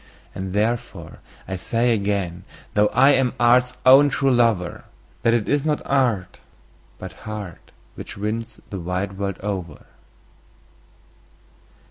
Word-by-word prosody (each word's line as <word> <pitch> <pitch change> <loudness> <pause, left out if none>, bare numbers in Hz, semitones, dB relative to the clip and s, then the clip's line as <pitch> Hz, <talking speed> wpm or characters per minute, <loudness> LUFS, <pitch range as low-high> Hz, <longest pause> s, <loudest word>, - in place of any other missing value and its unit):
And 95 0 -5
therefore 105 -6 -2 0.3
I 95 - -3
say 115 +5 +1
again, 100 -4 -2 0.3
though 105 0 +4
I 135 +6 +5
am 130 -3 +2
art's 125 +1 +3
own 135 +3 +8
true 135 +1 +1
lover, 115 -8 +1 0.4
That 115 0 +3
it 110 -3 -1
is 145 -1 +1
not 150 -1 0
art, 115 -10 0 0.6
but - - -8 0.2
heart, 105 -5 -8 0.2
which - - -9
wins 110 +2 -4
the 95 - -4
wide 90 +3 -4
world 100 -2 -2
over. 95 -6 -5
105 Hz, 125 wpm, -22 LUFS, 95-125 Hz, 0.6 s, own